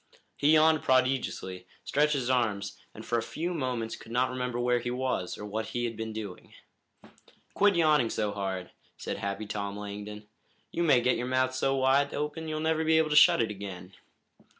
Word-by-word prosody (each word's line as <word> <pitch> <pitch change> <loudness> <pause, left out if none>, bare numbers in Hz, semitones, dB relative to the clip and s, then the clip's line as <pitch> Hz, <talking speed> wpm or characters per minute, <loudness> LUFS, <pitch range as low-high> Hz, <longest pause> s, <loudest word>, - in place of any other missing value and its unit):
He 145 +2 +3
yawned 155 0 +5
prodigiously, 130 -8 0 0.2
stretched 150 +2 +2
his 130 -4 -1
arms, 110 -6 0 0.2
and 110 - -11
for 120 - 0
a - - -2
few 170 +9 -4
moments 125 -7 -2
could 115 - -13
not 125 +2 +1
remember 125 -1 -3
where 120 0 +2
he 120 +1 -4
was, 125 -7 -2
or 105 - -7
what 110 +2 -3
he 120 0 -2
had 115 -1 -3
been 110 0 -5
doing. 105 -4 -8 1.0
"Quit 205 -1 +4
yawning 150 -8 +3
so 105 -2 -1
hard," 95 -3 -4 0.3
said - - -4
Happy 100 +2 -4
Tom 100 -1 -4
Langdon. 105 +1 -7 0.4
"You - - -2
may 140 -7 +4
get 125 +1 +2
your 120 +1 -3
mouth 130 0 +1
so 135 +1 +1
wide 135 +2 +2
open 150 +2 -3
that - - -5
you'll 155 0 -2
never 160 0 +1
be 160 0 +4
able 160 -1 +2
to - - +2
shut 125 - +7
it 110 - -3
again." 95 -2 -8
125 Hz, 195 wpm, -29 LUFS, 105-145 Hz, 1.0 s, shut